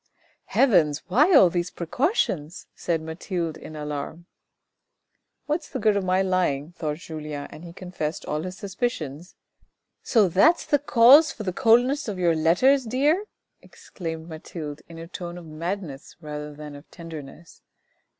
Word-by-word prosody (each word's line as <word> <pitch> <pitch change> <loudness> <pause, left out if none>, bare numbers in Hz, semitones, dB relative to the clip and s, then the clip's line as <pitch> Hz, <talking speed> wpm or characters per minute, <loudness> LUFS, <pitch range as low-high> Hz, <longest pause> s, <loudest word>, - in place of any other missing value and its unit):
" - - -40
Heavens, 170 - +3
why 290 - +4
all 185 -10 +7
these 175 0 -1
precautions? 175 - -1
" - - -50
said 165 -2 -2
Mathilde 165 0 -4
in 155 - -10
alarm. 150 +3 -5 0.6
" - - -53
What 300 +3 0
is - - -14
the - - -4
good 215 -4 +2
of 200 - 0
my 185 +1 +2
lying? 175 -5 0
" - - -33
thought 155 -3 -3
Julien, 155 -3 -6
and 155 - -11
he 170 - -9
confessed 175 -3 -5
all 150 +1 -2
his 185 +2 -6
suspicions. 185 - -4 0.6
11 - - -54
So 220 -6 +3
that's 305 - +4
the 290 - +2
cause 275 +3 +7
for 215 - -7
the 185 -3 -2
coldness 245 +8 +3
of 205 -3 -3
your 175 -2 +2
letters, 240 - +3
dear," 290 - +1 0.4
exclaimed 160 -2 -8
Mathilde 155 -2 -7
in 165 - -10
a 165 0 -8
tone 175 -1 -7
of 175 - -10
madness 160 -2 -6
rather 150 -2 -6
than 150 0 -9
of 145 +2 -14
tenderness. 165 -1 -11
175 Hz, 170 wpm, -25 LUFS, 155-215 Hz, 0.6 s, all